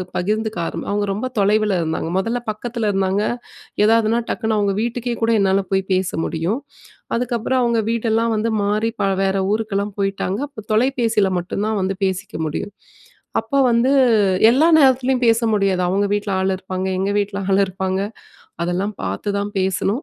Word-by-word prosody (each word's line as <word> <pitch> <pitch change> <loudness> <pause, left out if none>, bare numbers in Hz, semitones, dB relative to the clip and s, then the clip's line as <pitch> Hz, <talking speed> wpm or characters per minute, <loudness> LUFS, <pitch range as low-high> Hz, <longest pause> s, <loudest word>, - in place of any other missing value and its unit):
பகிர்ந்துக்க 215 +3 -1
ஆரம் - - -5
அவுங்க 205 0 0
ரொம்ப 220 +6 -3
தொலைவுல 210 -1 +2
இருந்தாங்க. 160 0 -2
மொதல்ல 230 +5 -1
பக்கத்துல 225 0 -3
இருந்தாங்க, 195 +1 +1 0.6
ஏதாவதுனா 225 +1 +3
டக்குனு 220 -2 -1
அவுங்க 200 -1 +1
வீட்டுக்கே 240 +1 -2
கூட 230 - +3
என்னால 195 0 +3
போய் 190 0 +2
பேச 185 0 +1 0.2
முடியும். 170 - -1 0.6
அதுக்கப்புறம் 245 +1 0
அவங்க 235 -1 +2
வீடெல்லாம் 230 0 +1
வந்து 225 +2 0
மாறி 215 +3 +1
ப - - +2 0.2
வேற 195 0 +1 0.2
ஊருக்கெல்லாம் 205 -2 -2
போயிட்டாங்க. 195 +1 -1
அப்போ, 275 - -11
தொலைபேசியில 230 -4 +2
மட்டும் 190 +4 -3
தான் 220 -2 0
வந்து 190 +1 -1
பேசிக்க 190 +1 -3
முடியும். 175 +6 -4 0.7
அப்ப 280 - -5
வந்து 235 +3 +3 0.6
எல்லா 285 +7 +4
நேரத்துலயும் 260 -2 +3
பேச 225 0 +4
முடியாது. 195 -3 +1
அவுங்க 200 +3 +1
வீட்ல 205 -1 -1
ஆள் 190 0 +1
இருப்பாங்க. 185 0 -4
எங்க 195 +1 0
வீட்ல 200 0 -2
ஆள் 195 +1 +3
இருப்பாங்க 190 0 -2 0.6
அதெல்லாம் 185 +4 -1
பாத்துதான் 200 - -2
பேசணும். 190 - 0
205 Hz, 155 wpm, -20 LUFS, 195-230 Hz, 0.7 s, எல்லா